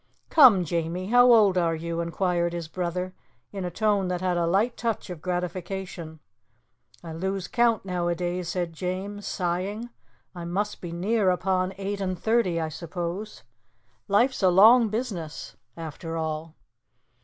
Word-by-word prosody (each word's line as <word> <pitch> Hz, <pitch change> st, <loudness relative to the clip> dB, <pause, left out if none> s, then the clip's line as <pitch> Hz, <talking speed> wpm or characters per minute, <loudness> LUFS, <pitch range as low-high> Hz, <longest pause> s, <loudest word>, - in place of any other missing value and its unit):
"Come, 240 Hz, -, +7 dB
Jamie, 170 Hz, +2 st, -2 dB
how 245 Hz, +1 st, +6 dB
old 205 Hz, -5 st, +5 dB
are 165 Hz, -1 st, +1 dB
you?" 170 Hz, +1 st, -3 dB
inquired 170 Hz, 0 st, 0 dB
his 170 Hz, -2 st, -4 dB
brother 180 Hz, +2 st, -3 dB, 0.4 s
in 195 Hz, -2 st, -5 dB
a 180 Hz, -, -2 dB
tone 205 Hz, +1 st, +1 dB
that 180 Hz, -1 st, -1 dB
had 185 Hz, -1 st, 0 dB
a 170 Hz, -1 st, +1 dB
light 210 Hz, +8 st, +2 dB
touch 230 Hz, -5 st, -3 dB
of 170 Hz, -4 st, -8 dB
gratification. 180 Hz, -2 st, -4 dB, 0.8 s
"I 165 Hz, -2 st, -7 dB
lose 190 Hz, +3 st, -3 dB
count 235 Hz, -4 st, +2 dB
nowadays," 175 Hz, -1 st, -2 dB
said 175 Hz, -2 st, -2 dB
James, 190 Hz, +4 st, -4 dB
sighing. 195 Hz, +6 st, -2 dB, 0.4 s
"I 175 Hz, -2 st, -7 dB
must 200 Hz, +5 st, -2 dB
be 175 Hz, -, -6 dB
near 195 Hz, +4 st, +1 dB
upon 185 Hz, 0 st, 0 dB
eight 200 Hz, +1 st, -3 dB
and 185 Hz, -1 st, -2 dB
thirty, 220 Hz, -5 st, +1 dB
I 160 Hz, -1 st, -2 dB
suppose. 175 Hz, +5 st, -5 dB, 0.6 s
Life's 235 Hz, +6 st, +2 dB
a 190 Hz, -, +5 dB
long 220 Hz, +6 st, +7 dB
business, 200 Hz, -9 st, -5 dB, 0.2 s
after 165 Hz, +1 st, -6 dB
all." 160 Hz, 0 st, -4 dB
180 Hz, 145 wpm, -26 LUFS, 170-200 Hz, 0.8 s, Come